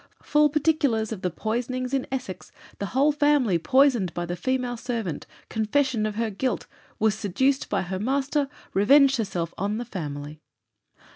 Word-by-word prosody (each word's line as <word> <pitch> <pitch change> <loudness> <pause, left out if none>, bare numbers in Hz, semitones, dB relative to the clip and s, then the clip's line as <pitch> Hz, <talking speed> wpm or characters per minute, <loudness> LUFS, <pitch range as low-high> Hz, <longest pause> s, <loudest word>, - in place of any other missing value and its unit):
"Full 295 0 +4
particulars 285 -7 +1
of 210 -4 -5
the 180 - 0
poisonings 245 +7 -3
in 270 -1 0
Essex, 250 -8 -5 0.3
the 200 - -2
whole 275 +7 +3
family 290 - +2
poisoned 260 - +3
by 175 - -2
the 175 +1 -3
female 250 +5 -1
servant. 225 - -4 0.2
Confession 220 +1 0
of 210 - -5
her 225 0 -1
guilt. 255 +6 -2 0.3
Was 220 -1 +2
seduced 245 +7 0
by 200 - 0
her 185 +1 -4
master. 275 +4 0 0.2
Revenged 270 +7 +5
herself 180 -7 -3
on 205 +3 -1
the 240 - -4
family." 150 -7 -6
230 Hz, 155 wpm, -25 LUFS, 195-270 Hz, 0.3 s, Revenged